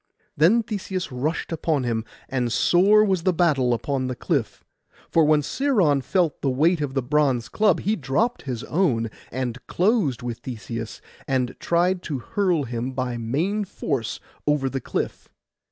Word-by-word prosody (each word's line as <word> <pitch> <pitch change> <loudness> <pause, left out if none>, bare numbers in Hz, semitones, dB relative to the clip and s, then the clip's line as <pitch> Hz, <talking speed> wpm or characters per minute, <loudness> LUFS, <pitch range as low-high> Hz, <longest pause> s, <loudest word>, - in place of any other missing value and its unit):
Then 190 +11 +4
Theseus 195 -5 -4
rushed 145 +8 -2
upon 155 -3 0
him; 115 -2 -1 0.2
and 125 -3 -1
sore 200 - +5
was 190 -4 +1
the 185 +2 +2
battle 150 -7 +2
upon 130 +2 -1
the 125 - -3
cliff, - - -2 0.5
for 165 -2 +5
when 150 0 +4
Sciron 190 - +2
felt 170 +2 0
the 140 - +1
weight 155 +6 +2
of 140 -2 -3
the 135 - +1
bronze 135 -3 +1
club, 210 - +2
he 210 +2 +1
dropt 195 - 0
his 125 -4 -5
own, 125 - +1 0.2
and 125 -1 -3
closed 180 - +1
with 120 -2 -4
Theseus, 115 -2 -6 0.3
and 130 -2 0
tried 175 +2 +1
to 150 -6 -3
hurl 175 +4 0
him 120 +1 -4
by 125 -2 -2
main 160 - -1
force 135 - -3 0.3
over 140 -3 +1
the 135 - -3
cliff. - - -4
145 Hz, 160 wpm, -24 LUFS, 125-180 Hz, 0.5 s, sore